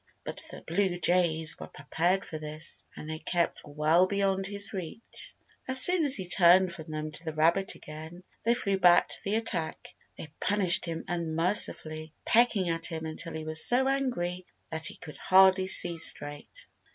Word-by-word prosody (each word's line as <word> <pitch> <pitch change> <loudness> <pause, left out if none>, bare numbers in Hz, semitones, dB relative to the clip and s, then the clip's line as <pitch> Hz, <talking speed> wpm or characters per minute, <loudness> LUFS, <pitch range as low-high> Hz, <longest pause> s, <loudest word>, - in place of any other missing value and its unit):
But - - -3
the - - -11
blue 180 +1 -2
jays 165 -2 +2
were - - -9
prepared 175 +6 -2
for 155 - -8
this, 155 +1 -5
and 155 - -10
they 155 0 -6
kept 175 0 -2
well 155 +5 +1
beyond 195 -1 -1
his 200 +1 -1
reach. 190 +4 -10 0.3
As 260 0 +5
soon 360 +4 +5
as 280 -2 +8
he 190 -3 0
turned 180 0 +4
from 160 -1 -11
them 155 0 -6
to 155 - -6
the 160 -2 -7
rabbit 170 +5 +1
again 160 +4 -12 0.2
they 235 +1 0
flew 200 -5 -2
back 175 -1 +4
to - - +1
the 200 +2 -2
attack. 220 -8 -4 0.2
They 150 -1 -10
punished 185 -3 +2
him 165 -1 -6
unmercifully, 160 -2 0
pecking 225 -5 +2
at 165 0 -1
him 160 -1 -6
until 160 +1 -5
he 160 0 -7
was 155 0 +1
so 260 +2 +2
angry 185 -10 -3 0.2
that 160 0 -1
he - - -7
could 150 - -12
hardly 190 0 +3
see 175 -2 +3
straight. 145 - -1
175 Hz, 175 wpm, -27 LUFS, 160-195 Hz, 0.3 s, as